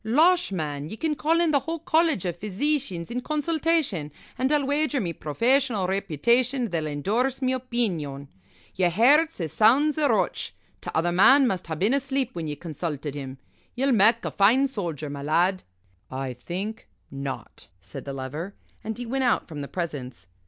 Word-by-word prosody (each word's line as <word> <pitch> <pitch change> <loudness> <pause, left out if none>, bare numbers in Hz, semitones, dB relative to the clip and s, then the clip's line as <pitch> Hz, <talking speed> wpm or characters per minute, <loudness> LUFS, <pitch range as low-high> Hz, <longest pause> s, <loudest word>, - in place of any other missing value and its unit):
Losh, 315 - +3
man 150 -4 -3
ye 220 - -7
can 315 +3 0
call 310 +4 +1
in 340 -2 +3
the 285 - +4
whole 325 +5 -4
College 320 - +1
of 175 -1 -3
Physeecians 215 - -1
in 250 +1 -2
consultation, 305 - 0 0.2
an' 260 +2 0
I'll 295 -2 +2
wager 290 0 0
me 175 -6 -2
professional 230 - +1
reputation 230 - +1
they'll 160 -3 -1
endorse 220 - -1
me 260 -1 0
opeenion. 190 - -2 0.5
Yer 185 -2 +2
hairt's 285 - +4
as 160 -4 -3
sound's 280 +8 +4
a 290 -2 +3
roach. 225 - 0 0.3
T'other 170 +2 -1
man 265 +10 +6
must 190 -7 -1
ha' 160 -1 -4
been 205 - +2
asleep 270 -2 0
when 165 -2 -4
ye 150 - -3
consulted 150 -2 -5
him. 135 -2 -7 0.4
Ye'll 270 +2 +1
mak' 225 +1 +4
a - - -2
fine 230 +8 +4
soldier, 170 - -4
my 140 0 -6
lad." 175 +6 +1 0.5
"I 130 0 -4
think 190 - -6 0.2
not," 140 0 -7
said 95 +1 -9
the 140 - -6
Lover 145 +9 -6 0.3
and 220 0 -4
he 245 - -5
went 260 +3 -1
out 245 - +1
from 150 -3 -7
the 140 - -5
presence. 145 -8 -5
210 Hz, 175 wpm, -25 LUFS, -, 0.5 s, man